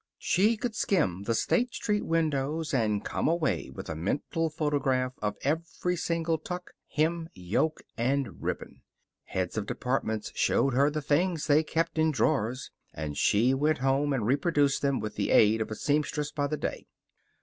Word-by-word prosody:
She 215 +5 +2
could 240 0 -3
skim 100 - 0
the 115 - +1
State 245 - +1
Street 210 -1 0
windows 155 -1 0
and 105 -5 +1
come - - -1
away 165 -2 0
with - - -8
a - - -3
mental 140 - -1
photograph 140 -4 0
of 105 -1 -2
every 165 +4 -1
separate 165 -2 -1
tuck, 180 0 -6 0.2
hem, 165 +2 0
yoke, 95 - -1 0.2
and 135 +3 -1
ribbon. - - -4 0.4
Heads 95 +3 -2
of 100 - -5
departments 115 -4 -2
showed 135 - +2
her 140 +3 +4
the 150 0 -3
things 160 +3 +1
they 150 +1 +5
kept 165 +1 -1
in 160 0 +4
drawers, 130 -4 0 0.2
and 75 -2 -4
she 115 - +3
went 150 +3 +2
home 135 +3 +1
and 125 -6 0
reproduced 140 +2 +2
them 140 -2 +1
with 110 - -5
the 100 - 0
aid 110 +1 +5
of 110 - -2
a 110 - -4
seamstress 150 +2 0
by 145 -1 -1
the 150 +1 -2
day. - - -4
145 Hz, 170 wpm, -28 LUFS, 125-160 Hz, 0.4 s, they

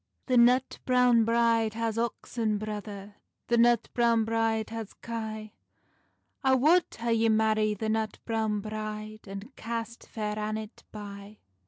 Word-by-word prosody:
"The 255 - +1
nut 250 +2 +4
browne 250 -3 +4
bride 230 -1 +2
has 230 -1 -1
oxen, 230 -2 -1
brother, 205 -1 -6 0.3
The 235 - +3
nut 235 -1 +4
browne 235 -2 +3
bride 225 -1 0
has 225 -2 -6
kye; 220 -2 -6 0.9
I 265 -1 +5
wad 320 +8 +5
hae 235 0 0
ye 225 0 +3
marrie 215 -1 +2
the 220 - -3
nut 220 -1 -1
browne 220 -2 0
bride, 215 0 -6
And 200 +7 -8
cast 230 0 -5
Fair 210 -1 -3
Annet 215 +1 -5
bye." 205 0 -9
220 Hz, 140 wpm, -28 LUFS, 215-235 Hz, 0.9 s, I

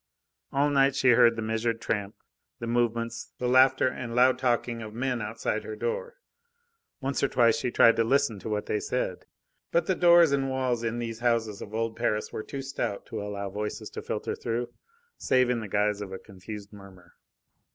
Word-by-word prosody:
All 145 +2 +2
night 135 -1 +3
she 130 -2 +3
heard 120 -1 +6
the 115 - -4
measured 115 +1 -1
tramp, 105 -3 -3 0.4
the 115 - -6
movements, 115 -1 -1
the 125 - -2
laughter 130 +1 +5
and 120 -2 -4
loud 130 +1 +4
talking 120 -2 0
of 110 -1 -8
men 125 0 -1
outside 110 +2 -3
her 435 - -6
door. 480 +2 -3 0.9
Once 135 0 -1
or 140 - +3
twice 120 -4 +3
she 125 - -1
tried 115 -1 +5
to 115 - +4
listen 125 -3 +1
to 110 - -6
what 105 -1 -2
they 105 - -1
said. 105 -8 -3 0.4
But 170 - +2
the 190 - +1
doors 170 -3 +6
and 135 -1 +1
walls 130 -3 -1
in 115 0 -2
these 115 -1 -4
houses 115 -3 0
of 105 - -7
old 115 0 -1
Paris 110 -2 -1
were - - -3
too 135 +4 -6
stout 135 -7 -3
to - - -5
allow 100 -1 -5
voices 105 +1 -5
to - - -6
filter - - -3
through, 120 +1 -3 0.5
save 125 -1 +3
in 120 - 0
the 110 - -6
guise 105 +1 0
of 100 -2 -6
a 95 - -5
confused 100 +2 -10
murmur. 95 -3 -15
115 Hz, 195 wpm, -27 LUFS, 105-130 Hz, 0.9 s, heard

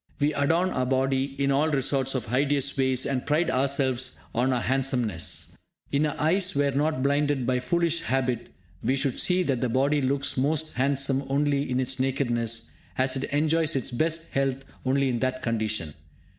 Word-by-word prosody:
We 150 +1 +1
'adorn' 165 +6 +1
our 130 -1 -1
body 135 +1 0
in 140 0 +1
all 145 +1 +2
sorts 135 0 +1
of 125 - -2
hideous 140 +3 +1
ways, 130 -2 +1
and 130 -2 -1
pride 160 +3 +1
ourselves 130 -1 +1 0.2
on 125 +3 +1
our 125 -1 0
handsomeness! 125 - -1 0.3
If 140 +1 +2
our 150 -1 -2
eyes 180 +4 +2
were 140 0 +2
not 145 0 0
blinded 140 -2 +1
by 125 0 +1
foolish 170 +5 +1
habit, 125 0 -1 0.3
we 130 - +1
should 135 -2 -1
see 180 0 +2
that 135 -7 -1
the 125 - 0
body 140 +4 +1
looks 135 +1 0
most 155 +4 0
handsome 135 +1 +1
only 140 0 0
in 125 0 0
its 130 +1 -1
nakedness, 120 -4 -1 0.3
as 130 0 +1
it 135 - -2
enjoys 155 +1 +1
its 135 0 -1
best 165 +6 -1
health 135 0 -1 0.2
only 135 +1 +2
in 120 -2 -1
that 130 +1 -2
condition. 110 - -1
135 Hz, 175 wpm, -26 LUFS, 130-145 Hz, 0.3 s, all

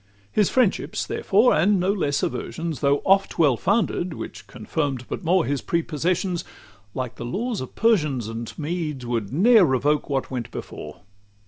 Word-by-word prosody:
XVII 100 0 -34
His 210 -3 +2
friendships, 250 -7 +1
therefore, 215 +6 +3
and 195 +4 +3
no 185 +3 +2
less 145 -7 -1
aversions, 165 -2 -3
Though 140 0 +2
oft 195 0 +3
well 145 -6 +4
founded, 185 - 0
which - - -8
confirm'd 130 +1 -3
but - - -5
more 175 +1 +3
His 140 -1 -1
prepossessions, 170 +2 -1 0.5
like 130 -2 -4
the - - -6
laws 215 - -2
of 130 - -8
Persians 150 - +2
And 115 0 -5
Medes, 155 -4 -3
would 115 -4 -2
ne'er 215 - +6
revoke 145 +1 +1
what 135 -1 -2
went 125 -3 -4
before. 75 0 -8
155 Hz, 160 wpm, -23 LUFS, 130-185 Hz, 0.5 s, ne'er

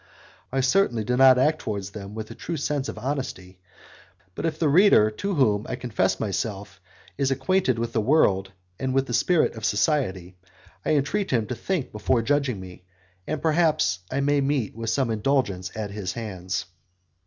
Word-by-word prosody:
I 135 +1 +1
certainly 130 - +2
did 125 +3 0
not 130 -1 +7
act 155 +4 +2
towards 100 -3 -4
them 100 0 -8
with 110 -1 -6
a - - -6
true 170 - -5
sense 145 -1 -2
of - - -7
honesty, 125 -10 -5 0.7
but 165 - -2
if 155 -1 -3
the 160 - +1
reader 145 - +5
to 200 - -3
whom 110 -7 +2
I 130 - -2
confess 95 -7 -1
myself 100 -1 -4 0.4
is 135 - +2
acquainted 135 0 +1
with 115 0 -3
the 110 - +1
world 100 -7 +2 0.3
and 130 0 -1
with 135 0 +2
the 120 - -5
spirit 165 +7 +2
of 110 - -10
society, 100 - 0 0.5
I - - +2
entreat 190 +9 0
him 115 -4 +1
to 125 - -4
think 175 +1 -2
before 115 +3 0
judging 140 -4 0
me, 90 -1 -11 0.4
and 155 0 -3
perhaps 155 - +2
I 135 +2 0
may 145 0 +2
meet 135 -7 -1
with 115 0 -4
some 125 0 +1
indulgence 105 -5 0
at 105 -2 -4
his 100 -3 -4
hands. 95 -5 -4
125 Hz, 180 wpm, -25 LUFS, 105-145 Hz, 0.7 s, not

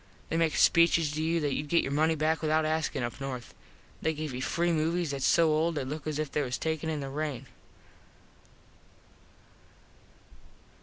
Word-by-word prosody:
They 165 - 0
make 165 -2 +1
speeches 165 -2 +4
to 155 +1 -3
you 165 +1 +1
that 145 -1 0
youd 150 - -3
get 170 +3 +3
your 135 - -3
money 155 +3 +2
back 155 +1 0
without 155 0 +2
askin 155 -4 -1
up 120 +3 -5
north. 130 -3 -6 0.5
They 160 0 0
give 150 -2 -4
you 125 - -4
free 170 +5 0
movies 165 0 0
thats 140 -1 0
so 165 -2 +4
old 160 +2 +1
they 145 - -1
look 150 +3 -6
as 155 -1 -2
if 155 -2 -3
they 150 - 0
was 125 -3 -2
taken 160 0 -2
in 155 -2 -2
the 135 - -5
rain. 140 -3 -4
155 Hz, 185 wpm, -29 LUFS, 145-160 Hz, 0.5 s, speeches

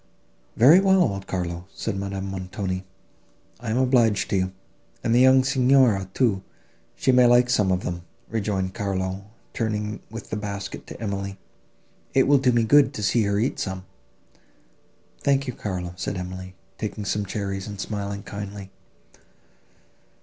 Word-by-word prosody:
"Very 145 +10 +8
well, 190 -1 +5
old 100 - -2
Carlo," 90 -1 -3
said 110 - -3
Madame 100 0 -4
Montoni; 95 0 -4 0.8
"I 115 -1 -5
am 110 - 0
obliged 120 -6 +3
to - - +2
you." 95 0 0 0.5
"And 115 - +1
the 120 - +5
young 130 0 +6
Signora, 130 -7 +3
too, 110 -7 +2 0.5
she 130 - +2
may 125 -1 +6
like 120 +1 +5
some 105 -6 +3
of 90 0 0
them," 85 0 -3 0.3
rejoined 100 -4 -2
Carlo, 95 -2 -3 0.3
turning 105 -2 -2
with 115 +1 -9
the - - -1
basket 100 -1 -6
to - - -9
Emily, 100 -2 -4 0.8
"it 135 - +5
will 140 -1 +5
do 130 -1 +3
me 120 -1 +3
good 145 +5 +5
to 105 - -4
see 115 +4 +3
her 100 0 +1
eat 115 +6 0
some." 95 -1 -4 1.3
"Thank 140 -1 +2
you, 125 - -4
Carlo," 90 -5 -4
said 95 +1 -3
Emily, 95 +1 -7 0.2
taking 105 -1 -4
some 105 +1 0
cherries, 100 0 -4
and 100 -2 -7
smiling 100 0 -4
kindly. 100 -1 -7
100 Hz, 155 wpm, -24 LUFS, 95-120 Hz, 1.3 s, Very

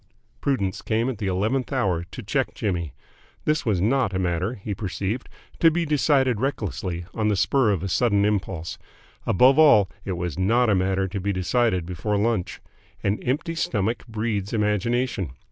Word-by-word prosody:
Prudence 100 -9 -1
came 115 +2 0
at 120 -5 -5
the 105 - -2
eleventh 110 +9 0
hour 95 -11 0
to 85 -2 -9
check - - -1
Jimmy. 85 -6 -2 0.5
This 150 -3 0
was 100 -5 +2
not 110 0 +1
a - - +1
matter, 90 +4 -1
he 100 0 -5
perceived, 100 +4 -3 0.3
to 165 - +6
be 170 +1 0
decided 135 -6 +2
recklessly, 95 -9 -3
on 110 -2 0
the 105 - +2
spur 125 +4 +2
of 95 -4 0
a - - -1
sudden 100 0 +2
impulse. 95 -5 -2 0.5
Above 130 - +5
all, 105 - +6
it 95 - -3
was 90 -2 -4
not 115 +5 +3
a - - +4
matter 95 +1 +1
to 100 +2 -4
be 100 +2 -1
decided 95 0 +1
before 95 +4 -2
lunch. 105 -3 -1 0.4
An 100 +2 0
empty 150 +6 -1
stomach 115 -8 -1
breeds 110 -3 -2
imagination. 105 - 0
105 Hz, 170 wpm, -24 LUFS, 95-125 Hz, 0.5 s, to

